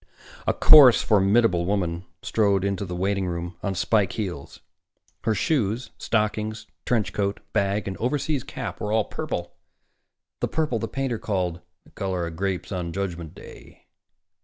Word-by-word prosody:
A - - +3
coarse, 140 -6 +8
formidable 100 -3 +3
woman 90 -3 -1 0.2
strode 100 -3 +2
into 100 0 -1
the 90 -1 -5
waiting 95 +1 0
room 85 0 -4
on 100 -2 -2
spike 95 0 +2
heels. 90 -10 -5 0.7
Her 110 -1 +2
shoes, 120 - 0
stockings, 110 0 -1 0.2
trench 115 -4 +1
coat, 100 -1 -1
bag 100 +1 0
and 95 - -3
overseas 140 +2 -1
cap - - -6
were 105 - -2
all 110 -1 +2
purple, - - -4 0.9
the - - 0
purple 150 -7 -1
the 115 - -3
painter 135 -4 -2
called 90 -4 -2 0.2
"the - - -21
color 95 -3 -2
of 85 -1 -6
grapes 95 +1 -2
on 90 -3 -3
Judgment 85 -4 -4
Day." - - -14
100 Hz, 150 wpm, -25 LUFS, 90-110 Hz, 0.9 s, coarse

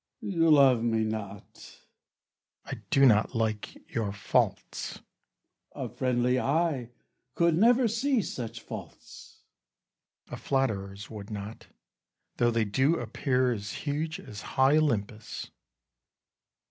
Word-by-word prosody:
Cas. 220 -4 -6
You 165 -1 +3
love 135 -6 +6
me 115 -1 +1
not. 105 -2 -7 0.9
Bru. - - -6
I - - -8
do 135 0 +5
not 110 0 +4
like 110 -2 -1 0.2
your 110 -4 -1
faults. 100 0 -1
Cas. - - -14 0.7
A - - -4
friendly 125 0 +1
eye 140 -4 0 0.5
could 170 -1 +3
never 240 +6 +5
see 235 +1 +1
such 115 -5 -6
faults. - - -11 0.8
Bru. - - -14
A - - -4
flatterer's 100 -8 -2
would 105 -2 -8
not, 105 0 -7 0.7
though 120 - +3
they 115 -1 +1
do 130 +10 +2
appear 125 0 0
As 105 -3 -4
huge 155 +2 -2
as 100 -2 -9 0.2
high 135 +3 +5
Olympus. 110 -8 -1
Cas. - - -10
125 Hz, 130 wpm, -28 LUFS, 110-150 Hz, 0.9 s, love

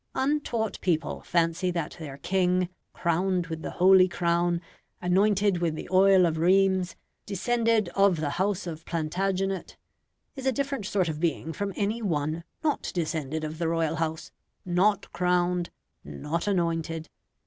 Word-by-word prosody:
Untaught 265 -6 -1
people 165 -4 -1
fancy 170 +1 +1
that 170 -3 -3
their 145 -4 -7
king, 180 +2 +1 0.2
crowned 180 +1 0
with 160 -1 -6
the - - -4
holy 185 0 +7
crown, 175 0 +1 0.4
anointed 195 +1 +2
with 165 -2 0
the - - -7
oil 190 0 +6
of 160 -2 0
Rheims, 190 +1 +3 0.3
descended 230 +1 +1
of 195 -3 +3
the 150 -2 -1
House 195 +2 -1
of 165 -2 -6
Plantagenet, 190 +4 -2 0.6
is 270 -1 -4
a - - +4
different 275 -5 -2
sort 190 -4 +1
of 155 -2 -3
being 165 -1 -1
from 200 +5 -3
any 215 +3 -1
one 160 -4 -1 0.2
not 300 -2 0
descended 160 -3 -2
of 155 +1 -5
the 170 - 0
Royal 165 -1 0
House 160 0 -3 0.3
not 185 +3 +1
crowned 180 -1 +1 0.3
not 150 - -4
anointed. 165 -4 -1
180 Hz, 145 wpm, -27 LUFS, 165-195 Hz, 0.6 s, holy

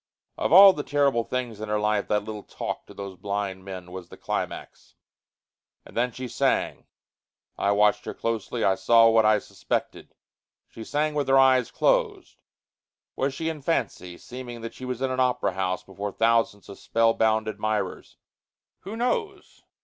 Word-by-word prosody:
Of - - -2
all 195 +3 +10
the 150 - -4
terrible 140 -5 +1
things 120 -3 -4
in 110 - -5
her 105 0 +1
life 105 -1 0
that 105 -1 +1
little 105 0 -6
talk - - -6
to - - -12
those 100 -1 -7
blind 100 0 -4
men 90 -2 -8
was 90 -2 -8
the - - -12
climax. - - -5 0.9
And - - -15
then 125 +1 +1
she 130 +2 -6
sang. - - -1 0.7
I 100 - +1
watched 105 0 +2
her - - -5
closely, 115 0 -3
and 95 - +4
I - - +1
saw 115 +3 +6
what 110 -1 +4
I 110 0 +5
suspected. - - -4 0.5
She 115 - -10
sang 150 +5 -1
with 145 -2 -1
her 135 0 +5
eyes 130 -3 +4
closed. - - 0 0.8
Was 135 0 -1
she 160 - -3
in 160 -2 -4
fancy 90 - -2
seeming 120 -2 -9
that 115 0 -7
she 130 - -9
was 125 0 -4
in 130 - 0
an 130 - -2
opera 125 -6 +1
house 95 -1 -2
before 100 +1 -6
thousands 115 -2 +1
of 100 - -11
spellbound 110 -1 +2
admirers? 110 0 -3 0.6
Who 205 +4 -8
knows? 390 - -3
115 Hz, 170 wpm, -25 LUFS, 105-130 Hz, 0.9 s, all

